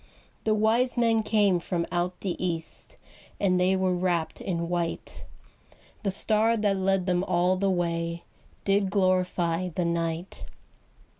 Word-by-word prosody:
The 215 -1 +3
wise 230 +4 +2
men 230 -2 +3
came 205 -4 +2
from 170 0 -2
out 175 +1 -2
the 190 -3 -1
east, 165 -3 -2 0.4
And 185 -2 +2
they 185 +1 +3
were 185 -1 +1
wrapped 175 -2 -1
in 170 -2 -2
white; 170 -1 -3 0.8
The 200 - -1
star 220 +3 +3
that 205 -2 +1
led 190 -1 +1
them 180 -1 +1
all 180 0 +2
the 195 +1 0
way 170 -2 -1 0.4
Did 195 0 +2
glorify 185 -2 +1
the 175 0 -2
night. 170 +1 -3
185 Hz, 140 wpm, -27 LUFS, 175-200 Hz, 0.8 s, The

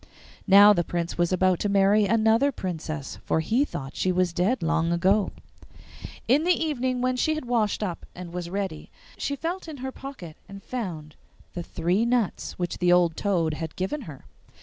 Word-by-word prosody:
Now 205 +2 +8
the 175 -3 +1
Prince 170 0 -3
was 175 0 +2
about 185 -1 +2
to 205 - -1
marry 200 +1 +4
another 225 +6 +3
princess, 160 - -5
for - - 0
he 225 - +2
thought 135 - -6
she 185 - +1
was 180 -1 +1
dead 185 +4 0
long 165 +1 +1
ago. 190 +4 +2 1.0
In 275 +6 +4
the 360 +2 +4
evening, 260 -5 -1
when 255 0 +1
she 310 +5 +1
had 310 - -5
washed 225 -4 0
up 180 -5 -5
and 180 -1 -8
was 175 -1 -4
ready, 190 -5 -4 0.3
she 285 - -3
felt 340 +5 -4
in 310 -3 -7
her 265 0 -5
pocket 260 - -9
and 195 0 -10
found 170 -11 -5 0.4
the 175 - -4
three 175 +5 0
nuts 235 -4 -1
which 175 -1 -3
the 180 0 +3
old 175 -2 +4
toad 170 -6 0
had 160 0 -6
given 190 +11 -3
her. 140 -3 -11
190 Hz, 185 wpm, -25 LUFS, 170-245 Hz, 1.0 s, Now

